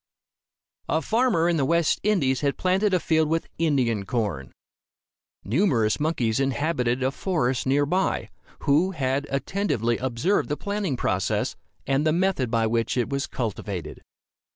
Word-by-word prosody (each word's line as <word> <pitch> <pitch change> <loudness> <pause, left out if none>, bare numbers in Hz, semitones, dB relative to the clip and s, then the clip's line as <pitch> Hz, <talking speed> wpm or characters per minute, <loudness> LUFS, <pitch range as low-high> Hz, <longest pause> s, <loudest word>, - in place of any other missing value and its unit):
A 160 - +2
farmer 225 -7 +2
in 170 -1 +2
the 140 - +1
West 170 +3 +2
Indies 145 -12 +1
had 140 -2 0
planted 190 +3 +2
a 185 - +3
field 160 -2 +1
with 165 +1 0
Indian 130 -10 +1
corn. 95 - -3 0.9
Numerous 115 - +1
monkeys 130 -8 0
inhabited 135 -2 0
a 130 - +1
forest 135 -7 -1
near 145 +2 +3
by, 185 +6 -1 0.3
who 160 +6 +2
had 140 -2 -1
attentively 135 - -1
observed 130 - 0
the 150 - -1
planting 200 -9 -2
process, 95 -5 -1 0.3
and 135 +2 +1
the 155 - +3
method 175 -8 +1
by 115 -1 +1
which 115 +2 0
it 120 - 0
was 140 0 -1
cultivated. 100 - -5
140 Hz, 145 wpm, -25 LUFS, 120-170 Hz, 0.9 s, a